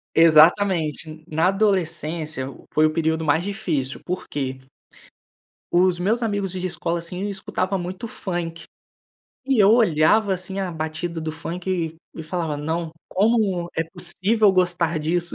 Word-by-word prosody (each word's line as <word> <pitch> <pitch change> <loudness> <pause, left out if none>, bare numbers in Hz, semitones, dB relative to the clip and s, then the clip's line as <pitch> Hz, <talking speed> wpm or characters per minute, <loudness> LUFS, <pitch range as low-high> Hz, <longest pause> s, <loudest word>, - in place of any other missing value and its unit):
Exatamente, 160 -1 +4
na 160 +3 +2
adolescência 165 -7 0 0.3
foi 155 0 +4
o - - -1
período 160 0 0
mais 160 +2 +2
difícil, 175 -10 -3
por 180 +1 -4
quê? 135 -2 -3 1.1
Os 180 0 +3
meus 220 +7 +1
amigos 205 -4 -1
de 185 0 -3
escola, 170 -1 -2
assim, 180 +4 -4
escutavam 190 0 -2
muito 185 +5 -5
funk. 175 -5 -5 0.8
E 270 -3 +2
eu 200 -1 +6
olhava 210 -1 +4
assim, 190 +1 -4
a 190 -2 -2
batida 160 +1 -4
do 160 0 -3
funk 175 +3 -6
e 165 -3 -2 0.2
e 160 - -6
falava: 160 -2 -3
"Não, 160 +3 -3 0.2
como 200 -4 +1
é 165 - +1
possível 190 +5 +2
gostar 175 -3 +1
disso?”. 170 +3 -1
175 Hz, 140 wpm, -23 LUFS, 160-190 Hz, 1.1 s, eu